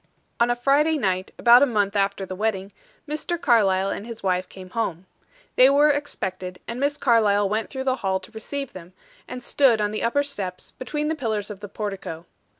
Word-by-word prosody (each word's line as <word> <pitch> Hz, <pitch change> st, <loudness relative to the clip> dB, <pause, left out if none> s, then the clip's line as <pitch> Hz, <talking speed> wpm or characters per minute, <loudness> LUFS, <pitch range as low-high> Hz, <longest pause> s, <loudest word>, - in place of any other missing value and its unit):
On 235 Hz, +1 st, +3 dB
a 240 Hz, -, +2 dB
Friday 290 Hz, +5 st, +2 dB
night, 190 Hz, -6 st, -1 dB
about 240 Hz, +1 st, +7 dB
a 285 Hz, -, +5 dB
month 205 Hz, -4 st, 0 dB
after 195 Hz, -1 st, 0 dB
the 185 Hz, -, -6 dB
wedding, 200 Hz, -1 st, -2 dB, 0.4 s
Mr. 310 Hz, +3 st, -3 dB
Carlyle 195 Hz, -, +3 dB
and 210 Hz, -, -5 dB
his 230 Hz, -3 st, -9 dB
wife 185 Hz, -1 st, 0 dB
came 185 Hz, -1 st, -12 dB
home. 190 Hz, -6 st, -3 dB, 0.5 s
They 255 Hz, +1 st, +8 dB
were 290 Hz, +2 st, +5 dB
expected, 185 Hz, -11 st, -4 dB
and 235 Hz, +1 st, -5 dB
Miss 285 Hz, +1 st, 0 dB
Carlyle 210 Hz, -6 st, +3 dB
went 215 Hz, +2 st, -2 dB
through 265 Hz, -1 st, -4 dB
the 260 Hz, -1 st, 0 dB
hall 190 Hz, -4 st, -1 dB
to 185 Hz, -, -14 dB
receive 275 Hz, +5 st, -6 dB
them, 180 Hz, 0 st, -11 dB, 0.3 s
and 250 Hz, 0 st, -7 dB
stood 245 Hz, -4 st, +3 dB
on 210 Hz, 0 st, 0 dB
the 215 Hz, -, -3 dB
upper 285 Hz, +5 st, +1 dB
steps, 195 Hz, -10 st, -5 dB
between 295 Hz, +3 st, -4 dB
the 315 Hz, -, 0 dB
pillars 220 Hz, -8 st, -3 dB
of 200 Hz, -, -9 dB
the 205 Hz, -1 st, -8 dB
portico. 195 Hz, -6 st, -5 dB
220 Hz, 200 wpm, -24 LUFS, 195-265 Hz, 0.5 s, They